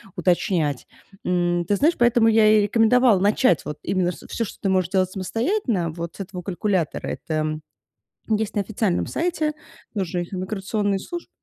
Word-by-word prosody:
уточнять. 170 -5 0 0.4
М, 175 -1 +1
ты 205 - +1
знаешь, 315 +9 +3
поэтому 240 -1 +4
я 220 -1 +5
и 215 -1 +5
рекомендовала 225 0 +4
начать 205 - +3
вот 150 0 -6
именно 180 -2 0
с - - -11
ш - - -14
всё, 230 - -2
что - - -10
ты 195 - 0
можешь 185 -2 +1
делать 185 -1 +1
самостоятельно, 225 - -1
вот 170 +1 -6
с - - -16
этого 185 -1 -6
калькулятора. 185 -2 -1
Это 155 -1 -2 0.7
есть 220 0 0
на 205 - +1
официальном 200 -2 -1
сайте, 325 -3 -1 0.4
тоже 185 -3 -2
их 175 - -8
иммиграционные 195 +1 -1
служб 345 - -7
195 Hz, 170 wpm, -23 LUFS, 175-220 Hz, 0.7 s, я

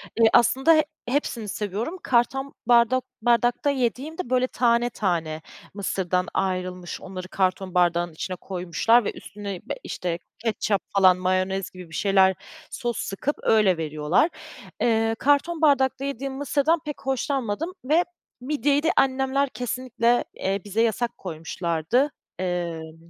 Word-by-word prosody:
Iıı, 225 -1 +5
aslında 265 +7 +5
he 310 - +4 0.2
hepsini 245 -5 -1
seviyorum. 215 - -3
Karton 270 +3 +1
bardok 245 +1 +4 0.2
bardakta 240 +4 +2
yediğim 270 +4 -1
de 250 - -4
böyle 255 0 +2
tane 240 -1 +2
tane 165 -8 -2 0.3
mısırdan 185 -2 -1
ayrılmış. 185 -2 -2
Onları 185 -1 -7
karton 185 0 -1
bardağın 175 -1 +2
içine 185 +3 -4
koymuşlar 190 +6 +1
ve - - 0
üstüne, 200 -1 -7
eee, - - -10 0.2
işte, 175 -1 -3 0.2
ketçap 215 -3 0 0.2
falan 185 -2 +6
mayonez 185 +1 0
gibi 180 -2 -11
bir 160 - -9
şeyler 190 -2 +4 0.4
sos 240 -3 -3
sıkıp 260 +9 -2
öyle 210 -6 +4
veriyorlar. 155 - +1 0.5
Iıı, 225 -1 +2
karton 290 +6 +1
bardakta 275 -2 +3
yediğim 275 0 -4
mısırdan 285 +4 +1
pek 295 - -6
hoşlanmadım 270 - -1
ve 320 +5 +4 0.4
midyeyi 285 +2 +1
de 325 - +3
annemler 270 +1 +2
kesinlikle, 245 -1 0
eee, 195 0 -2
bize 210 +3 0
yasak 230 +1 0
koymuşlardı. 170 - -1 0.3
Imm 170 -2 -4
225 Hz, 135 wpm, -24 LUFS, 185-265 Hz, 0.5 s, falan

